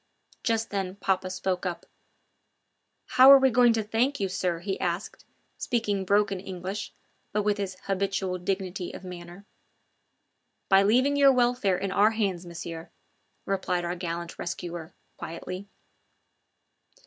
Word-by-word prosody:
Just 225 -2 -1
then 190 -2 -2
papa 190 -2 -1
spoke 185 -1 -2
up: 180 -2 -4 1.2
"How 260 +2 +7
are 275 - +11
we 265 -1 +3
going 240 0 +5
to 225 -1 0
thank 240 +7 0
you, 195 -1 -1
sir?" 180 -2 -1
he 190 +3 -4
asked, 175 +2 -3 0.3
speaking 210 -6 -1
broken 200 0 +2
English, 190 +2 -5 0.4
but 210 0 0
with 205 0 +1
his 190 -2 -4
habitual 195 -1 -1
dignity 185 -1 -3
of - - -9
manner. 180 +1 -10 1.2
"By 195 0 +6
leaving 255 +8 +3
your 280 -1 +7
welfare 245 -6 +2
in 195 0 -3
our 205 +2 +5
hands, 185 -5 -1
Monsieur," 165 -1 -7 0.6
replied 185 -2 -1
our 175 +1 -2
gallant 170 -1 -5
rescuer 175 -1 -6 0.2
quietly. 185 +4 -7
195 Hz, 135 wpm, -27 LUFS, 180-210 Hz, 1.2 s, are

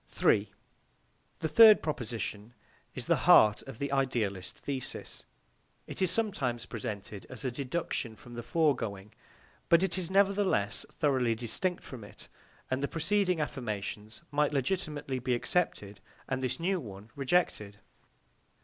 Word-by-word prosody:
3. 100 - +2 0.9
The 160 - +1
third 215 +7 +8
proposition 120 -6 -4 0.4
is - - -3
the - - +1
heart 105 -1 +7
of 135 -4 -8
the 140 +2 -3
idealist 115 -9 -1
thesis. 135 -3 -4 0.6
It - - -7
is 185 - +4
sometimes 155 - 0
presented 105 -4 -6
as 130 -1 -8
a 130 - 0
deduction 130 -3 -3
from 120 +2 -13
the 120 - -5
foregoing, 115 - 0 0.6
but 170 +2 +6
it 190 -1 0
is 175 -2 -2
nevertheless 195 - +2
thoroughly 130 -6 +1
distinct 125 - -2
from 125 -5 -9
it, 105 - -12 0.4
and 130 +1 0
the 140 - 0
preceding 180 +2 +1
affirmations 110 -3 -4
might 150 0 +2
legitimately 145 -2 -1
be 125 0 0
accepted 115 - -1 0.3
and 130 -1 -2
this 130 0 -2
new 185 +2 0
one 105 - -10
rejected. 130 - 0
130 Hz, 135 wpm, -30 LUFS, 110-165 Hz, 0.9 s, third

